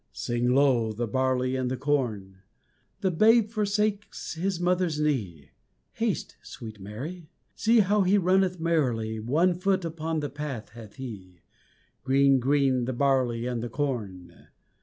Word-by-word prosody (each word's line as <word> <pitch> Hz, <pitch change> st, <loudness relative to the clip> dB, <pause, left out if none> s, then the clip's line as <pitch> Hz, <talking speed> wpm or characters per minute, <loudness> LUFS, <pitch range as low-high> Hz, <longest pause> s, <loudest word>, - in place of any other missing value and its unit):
Sing 120 Hz, +1 st, 0 dB
low, 130 Hz, -5 st, +3 dB
the 115 Hz, +3 st, -3 dB
barley 130 Hz, +2 st, 0 dB
and 130 Hz, -1 st, -1 dB
the 130 Hz, -, -2 dB
corn! 120 Hz, -9 st, -1 dB, 0.6 s
The 190 Hz, -3 st, +1 dB
Babe 220 Hz, +5 st, +4 dB
forsakes 210 Hz, -1 st, -1 dB
His 180 Hz, +2 st, -2 dB
mother's 175 Hz, -3 st, +1 dB
knee, 95 Hz, -, -2 dB, 0.4 s
Haste, -, -, -3 dB
sweet 110 Hz, -3 st, -10 dB
Mary 145 Hz, -, -7 dB, 0.2 s
See 230 Hz, 0 st, +4 dB
how 205 Hz, +1 st, +2 dB
He 190 Hz, +2 st, +3 dB
runneth 185 Hz, -1 st, +2 dB
merrily, 125 Hz, -10 st, 0 dB
One 155 Hz, +11 st, +2 dB
foot 185 Hz, 0 st, 0 dB
upon 160 Hz, 0 st, -3 dB
the 145 Hz, -1 st, -3 dB
path 140 Hz, -6 st, -6 dB
hath 115 Hz, -3 st, -12 dB
He 95 Hz, -9 st, -9 dB, 0.6 s
Green, 135 Hz, 0 st, +4 dB
green, 135 Hz, -1 st, +2 dB
the 130 Hz, -, -2 dB
barley 125 Hz, -3 st, +1 dB
and 125 Hz, -2 st, -2 dB
the 120 Hz, -, -4 dB
corn! 105 Hz, -, -5 dB
135 Hz, 140 wpm, -27 LUFS, 120-175 Hz, 0.6 s, Babe